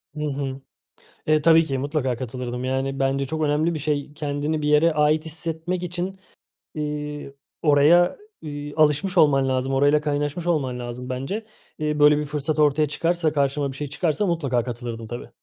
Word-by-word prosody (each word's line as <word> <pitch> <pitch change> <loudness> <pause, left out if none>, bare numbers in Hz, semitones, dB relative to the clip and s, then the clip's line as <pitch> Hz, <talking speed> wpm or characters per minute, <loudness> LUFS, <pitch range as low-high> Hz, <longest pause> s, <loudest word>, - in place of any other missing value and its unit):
Hı 150 - -4
hı. 135 -2 -3 0.7
Eee, 155 -1 +3
tabii 165 +1 +6
ki. 135 -4 -2
Mutlaka 135 -3 -1
katılırdım. 125 0 -5
Yani, 135 +1 -1
bence 135 0 0
çok 155 +3 -3
önemli 155 +3 +1
bir - - -3
şey. 145 -1 -2
Kendini 150 +1 -2
bir 150 - 0
yere 155 +2 +4
ait 150 +1 +2
hissetmek 165 +3 -4
için, 180 +2 -4 0.6
eee, 150 -2 -4 0.3
oraya, 155 +4 +5 0.2
iii, 145 -1 -6
alışmış 155 +5 +2
olman 135 -4 +5
lazım, 130 +1 0
orayla 145 +2 +4
kaynaşmış 150 +3 -2
olman 135 -7 0
lazım 125 +1 -6
bence. 135 - -4 0.3
Eee, 150 -1 -1
böyle, 150 0 +6
bir 150 - -1
fırsat 150 +1 -2
ortaya 150 0 +3
çıkarsa, 165 +1 0
karşıma 140 -1 0
bir 135 - -10
şey 145 0 -4
çıkarsa 155 +6 0
mutlaka 140 -9 0
katılırdım, 115 -2 -6
tabii. 120 +1 -7
150 Hz, 165 wpm, -23 LUFS, 135-155 Hz, 0.7 s, tabii